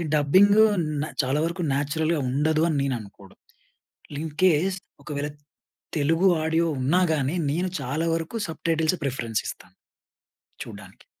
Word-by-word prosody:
ఈ -, -, -2 dB
డబ్బింగ్ 185 Hz, +8 st, +5 dB, 0.5 s
న్ 155 Hz, -, -2 dB, 0.2 s
చాలా 135 Hz, +3 st, 0 dB
వరకు 170 Hz, +2 st, -3 dB
నేచురల్‌గా 155 Hz, +2 st, 0 dB
ఉండదు 155 Hz, +4 st, +1 dB
అని 155 Hz, -, 0 dB
నేను 135 Hz, -3 st, 0 dB
అనుకోడం. 100 Hz, -2 st, -15 dB, 0.8 s
ఇన్ 160 Hz, -2 st, -4 dB
కేస్ 185 Hz, +2 st, +3 dB, 0.3 s
ఒకవేళ 145 Hz, 0 st, -3 dB, 0.7 s
తెలుగు 165 Hz, +6 st, +3 dB, 0.2 s
ఆడియో 160 Hz, +1 st, +2 dB, 0.2 s
ఉన్నా 170 Hz, +8 st, +3 dB
గాని, 145 Hz, +2 st, -1 dB, 0.2 s
నేను 180 Hz, +5 st, -1 dB
చాలా 145 Hz, +6 st, -2 dB
వరకు 165 Hz, +7 st, -4 dB
సబ్‌టైటిల్సే 160 Hz, +1 st, 0 dB
ప్రిఫరెన్స్ 115 Hz, -5 st, -2 dB
ఇస్తాను -, -, -9 dB, 0.9 s
చూడ్డానికి. -, -, -12 dB
155 Hz, 130 wpm, -25 LUFS, 140-170 Hz, 0.9 s, డబ్బింగ్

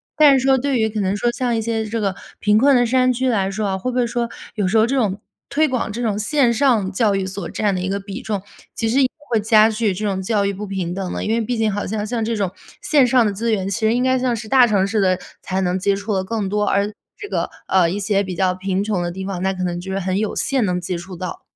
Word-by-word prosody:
但 290 Hz, -3 st, +6 dB
是 260 Hz, -, -3 dB
说 270 Hz, 0 st, +5 dB
对 265 Hz, -1 st, 0 dB
于 220 Hz, -, +2 dB
可 215 Hz, -1 st, -3 dB
能 190 Hz, 0 st, 0 dB
说 240 Hz, -, +1 dB
像 245 Hz, -1 st, -1 dB
一 -, -, 0 dB
些 225 Hz, 0 st, -1 dB
这 225 Hz, +2 st, -3 dB
个 195 Hz, -3 st, -1 dB, 0.2 s
贫 210 Hz, 0 st, +3 dB
困 275 Hz, +4 st, +5 dB
的 245 Hz, -1 st, +4 dB
山 255 Hz, +1 st, +3 dB
区 255 Hz, +1 st, -1 dB
来 195 Hz, -5 st, +1 dB
说 210 Hz, +1 st, -2 dB
啊， 190 Hz, -1 st, -1 dB
会 250 Hz, +7 st, -3 dB
不 250 Hz, -, -3 dB
会 245 Hz, -, +3 dB
说 235 Hz, 0 st, -2 dB, 0.3 s
有 205 Hz, -4 st, 0 dB
时 195 Hz, -, +2 dB
候 220 Hz, -, +5 dB
这 260 Hz, +4 st, -1 dB
种 205 Hz, -6 st, 0 dB, 0.3 s
推 310 Hz, +2 st, +2 dB
广 255 Hz, -5 st, -2 dB
这 235 Hz, +4 st, -5 dB
种 215 Hz, -4 st, 0 dB
线 245 Hz, +2 st, +2 dB
上 225 Hz, -6 st, +2 dB
教 205 Hz, 0 st, +2 dB
育 195 Hz, -1 st, -1 dB
所 190 Hz, -1 st, -5 dB
占 205 Hz, -2 st, 0 dB
的 185 Hz, -, -2 dB
一 185 Hz, -, -2 dB
个 200 Hz, +1 st, -1 dB
比 200 Hz, +4 st, -7 dB
重， 210 Hz, -5 st, -3 dB, 0.3 s
其 225 Hz, -, -1 dB
实 265 Hz, +5 st, +3 dB
也 260 Hz, -, +4 dB, 0.2 s
会 230 Hz, -2 st, +2 dB
加 215 Hz, +1 st, +5 dB
剧 215 Hz, -2 st, 0 dB
这 210 Hz, +4 st, -4 dB
种 195 Hz, -2 st, -1 dB
教 200 Hz, +1 st, 0 dB
育 200 Hz, -, +1 dB
不 205 Hz, +2 st, -6 dB
平 190 Hz, -3 st, -3 dB
等 185 Hz, -1 st, -4 dB
呢？ -, -, -3 dB
因 215 Hz, -, -1 dB
为 230 Hz, -, +1 dB
毕 230 Hz, +2 st, -1 dB
竟 220 Hz, -1 st, +1 dB
好 205 Hz, +1 st, -3 dB
像 210 Hz, +1 st, -2 dB
像 225 Hz, +1 st, -2 dB
这 230 Hz, +1 st, -1 dB
种 200 Hz, -4 st, -1 dB, 0.3 s
线 285 Hz, -5 st, +4 dB
上 245 Hz, -1 st, +4 dB
的 210 Hz, -, +1 dB
资 225 Hz, +4 st, -2 dB
源， 195 Hz, -2 st, -1 dB
其 200 Hz, -, -2 dB
实 220 Hz, 0 st, +2 dB
应 245 Hz, +1 st, +1 dB
该 260 Hz, 0 st, +2 dB
像 250 Hz, -1 st, 0 dB
是 220 Hz, -1 st, -7 dB
大 255 Hz, -1 st, +6 dB
城 200 Hz, -4 st, +2 dB
市 210 Hz, +2 st, -1 dB
的 185 Hz, -2 st, +3 dB, 0.2 s
才 190 Hz, 0 st, -2 dB
能 180 Hz, 0 st, 0 dB
接 200 Hz, +1 st, +1 dB
触 200 Hz, +2 st, -3 dB
得 190 Hz, -, +1 dB
更 210 Hz, -1 st, -2 dB
多， 210 Hz, +1 st, 0 dB
而 200 Hz, +1 st, +1 dB, 0.3 s
这 410 Hz, -, -8 dB
个， -, -, -1 dB, 0.2 s
呃， 185 Hz, -3 st, +4 dB
一 185 Hz, -, -2 dB
些 200 Hz, 0 st, +1 dB
比 185 Hz, -2 st, -4 dB
较 185 Hz, +1 st, +1 dB
贫 190 Hz, +1 st, -2 dB
穷 205 Hz, -4 st, -1 dB
的 175 Hz, -, -2 dB
地 190 Hz, +2 st, -6 dB
方， 190 Hz, -2 st, -4 dB
那 190 Hz, +1 st, 0 dB
可 185 Hz, -1 st, -4 dB
能 175 Hz, -1 st, -2 dB
就 185 Hz, +2 st, -8 dB
是 195 Hz, -, -1 dB
很 185 Hz, 0 st, -1 dB
有 215 Hz, 0 st, -1 dB
限 265 Hz, -5 st, +1 dB
能 180 Hz, -2 st, -1 dB
接 175 Hz, 0 st, -3 dB
触 180 Hz, +2 st, -9 dB
到。 180 Hz, +1 st, -6 dB
210 Hz, 320 characters per minute, -20 LUFS, 190-235 Hz, 0.3 s, 但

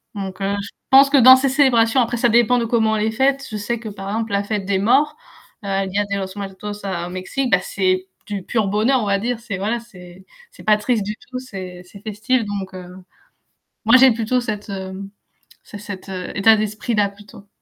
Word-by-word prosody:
Donc, 195 Hz, -1 st, -6 dB
heu, 200 Hz, +1 st, 0 dB
je 200 Hz, -, -8 dB, 0.2 s
pense 275 Hz, +1 st, +8 dB
que 285 Hz, -, +5 dB
dans 260 Hz, +1 st, +9 dB
ces 265 Hz, +1 st, +1 dB
célébrations 255 Hz, -3 st, +3 dB
après 240 Hz, 0 st, -1 dB
ça 240 Hz, 0 st, +2 dB
dépend 240 Hz, +2 st, +4 dB
de 230 Hz, -, -1 dB
comment 220 Hz, -1 st, +1 dB
elle 210 Hz, -, 0 dB
est 220 Hz, -, 0 dB
faite, 270 Hz, +3 st, +1 dB
je 215 Hz, -, -3 dB
sais 225 Hz, +3 st, -3 dB
que 220 Hz, -2 st, -7 dB
par 195 Hz, -1 st, -7 dB
exemple 220 Hz, 0 st, -3 dB
la 200 Hz, 0 st, +1 dB
fête 205 Hz, -2 st, -3 dB
des 195 Hz, -1 st, 0 dB
morts: 275 Hz, +8 st, +3 dB, 0.5 s
El 195 Hz, -1 st, -1 dB
dia 205 Hz, +2 st, 0 dB
de 200 Hz, 0 st, -3 dB
los 190 Hz, -1 st, -3 dB
muertos 205 Hz, +1 st, -6 dB
au 175 Hz, -2 st, -3 dB
Mexique, 200 Hz, +8 st, -3 dB
bah 190 Hz, -, +5 dB
c'est 185 Hz, -1 st, -1 dB, 0.2 s
du 200 Hz, -2 st, -4 dB
pur 220 Hz, 0 st, 0 dB
bonheur 225 Hz, +6 st, +2 dB
on -, -, -2 dB
va 200 Hz, 0 st, +1 dB
dire, 235 Hz, +2 st, -2 dB
c'est 220 Hz, -5 st, -5 dB
voilà, 225 Hz, +4 st, -1 dB
c'est 185 Hz, -5 st, -15 dB, 0.3 s
c'est -, -, -15 dB
pas 215 Hz, -1 st, +4 dB
triste 215 Hz, 0 st, 0 dB
du 210 Hz, -, -3 dB, 0.2 s
tout, 255 Hz, -, -5 dB
c'est 185 Hz, -7 st, -9 dB
c'est 200 Hz, +2 st, -14 dB
festif 220 Hz, +4 st, -1 dB
donc, 195 Hz, -2 st, -5 dB
heu, 180 Hz, -1 st, -8 dB, 1.0 s
moi 235 Hz, +3 st, +7 dB
j'ai 260 Hz, 0 st, +7 dB
plutôt 230 Hz, +3 st, 0 dB
cette 210 Hz, -2 st, -5 dB, 1.0 s
cet 205 Hz, -2 st, -9 dB, 0.3 s
état 220 Hz, +2 st, +5 dB
d'esprit-là 210 Hz, 0 st, -1 dB
plutôt, 205 Hz, 0 st, -16 dB
210 Hz, 210 wpm, -20 LUFS, 195-240 Hz, 1.0 s, dans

